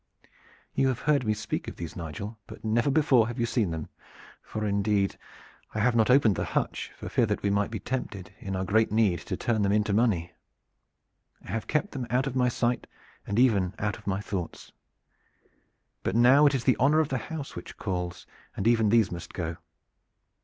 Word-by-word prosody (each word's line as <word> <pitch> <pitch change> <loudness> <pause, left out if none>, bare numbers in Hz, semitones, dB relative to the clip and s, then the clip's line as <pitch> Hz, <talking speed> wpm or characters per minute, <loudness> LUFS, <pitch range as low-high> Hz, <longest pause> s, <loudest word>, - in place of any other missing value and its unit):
"You 135 - +2
have 130 -2 -1
heard 145 -6 +2
me 105 - +2
speak 105 - -4
of - - -6
these, 85 -2 -7
Nigel, 95 +7 -6
but - - -11
never 115 +5 +2
before 135 -6 +4
have 120 +1 -5
you 120 - +2
seen 115 -5 0
them, 80 -2 -4 0.5
for 110 0 -4
indeed 100 -1 +1 0.6
I - - 0
have 120 +2 +3
not 110 0 +3
opened 125 -7 +5
the - - 0
hutch - - -2
for - - -7
fear 120 - +2
that 105 - -2
we 100 - +2
might 100 0 +1
be 110 - -4
tempted 100 -5 -5
in 95 -1 -4
our 95 0 -1
great 110 +4 +2
need 105 -6 +3
to - - -5
turn 115 -3 0
them 100 -1 +2
into 105 0 +2
money. 100 -6 +1 1.1
I - - -7
have 115 - -3
kept 160 +7 0
them 130 -4 -4
out 125 +3 +1
of 135 -2 -3
my 125 -1 +3
sight 120 0 -1 0.4
and 100 - -2
even 100 -7 +3
out 105 0 -2
of 105 - -18
my 100 0 0
thoughts. 95 -5 -5 1.3
But - - -2
now 130 +5 +7
it 140 - +2
is 125 - -1
the 130 - +3
honor 145 +5 +4
of 155 -2 +1
the 130 - -1
house 145 +4 -6
which - - -9
calls, 90 -3 -4 0.3
and 100 - 0
even 115 -2 +4
these 110 -2 +4
must 85 0 -7
go. 85 -2 -3
110 Hz, 205 wpm, -28 LUFS, 100-125 Hz, 1.3 s, now